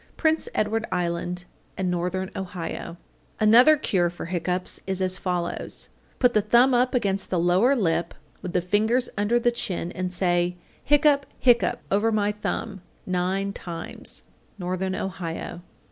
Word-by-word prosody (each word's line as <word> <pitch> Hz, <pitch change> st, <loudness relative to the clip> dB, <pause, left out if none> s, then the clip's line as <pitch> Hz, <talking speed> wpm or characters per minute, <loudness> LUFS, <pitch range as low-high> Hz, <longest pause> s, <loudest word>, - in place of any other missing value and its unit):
Prince 315 Hz, -1 st, +2 dB
Edward 220 Hz, +2 st, 0 dB
Island 175 Hz, 0 st, -2 dB, 0.3 s
and 185 Hz, -2 st, 0 dB
Northern 180 Hz, +2 st, -2 dB
Ohio. 175 Hz, -2 st, -5 dB, 0.4 s
850. -, -, 0 dB
Another 245 Hz, +8 st, +7 dB
cure 180 Hz, -, +1 dB
for 175 Hz, -, -7 dB
hiccoughs 180 Hz, +1 st, -2 dB
is 190 Hz, -1 st, -1 dB
as 185 Hz, 0 st, 0 dB
follows: 180 Hz, -2 st, -3 dB, 0.3 s
Put 250 Hz, -1 st, +3 dB
the 215 Hz, -, +4 dB
thumb 240 Hz, +5 st, +4 dB
up 250 Hz, +1 st, +2 dB
against 200 Hz, -5 st, 0 dB
the 185 Hz, -, 0 dB
lower 180 Hz, +10 st, +4 dB
lip, 170 Hz, -6 st, 0 dB, 0.3 s
with 180 Hz, -, -5 dB
the 180 Hz, -, +2 dB
fingers 220 Hz, +7 st, +1 dB
under 210 Hz, +4 st, +2 dB
the 240 Hz, 0 st, +2 dB
chin, 180 Hz, -7 st, -3 dB
and 185 Hz, -1 st, -3 dB
say, 175 Hz, -1 st, +1 dB, 0.3 s
"hiccup, 290 Hz, -1 st, +4 dB
hiccup, 240 Hz, -2 st, +3 dB
over 205 Hz, +3 st, +3 dB
my 210 Hz, -1 st, +1 dB
thumb," 210 Hz, -1 st, -4 dB, 0.2 s
nine 190 Hz, +2 st, -1 dB
times. 170 Hz, -4 st, -7 dB, 0.4 s
_Northern 185 Hz, +1 st, -2 dB
Ohio. 175 Hz, -2 st, -5 dB
190 Hz, 145 wpm, -25 LUFS, 180-225 Hz, 0.4 s, Another